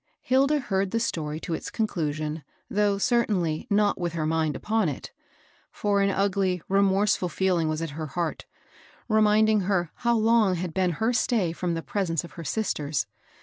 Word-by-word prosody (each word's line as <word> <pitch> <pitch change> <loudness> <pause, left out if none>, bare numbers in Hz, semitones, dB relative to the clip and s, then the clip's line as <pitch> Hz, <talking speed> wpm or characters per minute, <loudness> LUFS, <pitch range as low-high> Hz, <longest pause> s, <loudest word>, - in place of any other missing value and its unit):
Hilda 275 +4 +3
heard 195 -6 -1
the 230 - 0
story 155 -9 -2
to 170 - -4
its - - -4
conclusion, 155 -7 -2 0.3
though, 205 -1 +2
certainly, 195 -8 +1
not 205 -1 +2
with 170 -1 -2
her 160 -2 -2
mind 160 -1 0
upon 220 -5 0
it; 140 - -7 0.6
for 200 -1 0
an 200 - +3
ugly, 195 -2 +1
remorseful 195 -1 +2
feeling 175 -4 +1
was 155 +1 -2
at 165 - -4
her 155 +2 -5
heart, 165 +3 -3 0.6
reminding 215 -1 +4
her 180 -4 0
how 235 -1 +2
long 220 -3 +3
had 175 -1 -4
been 180 -1 +1
her 225 +9 0
stay 225 -8 +1
from 175 0 -2
the 165 - -4
presence 175 -6 -1
of 170 - -10
her 165 +2 -8
sisters. 150 -7 -1
190 Hz, 170 wpm, -26 LUFS, 165-210 Hz, 0.6 s, reminding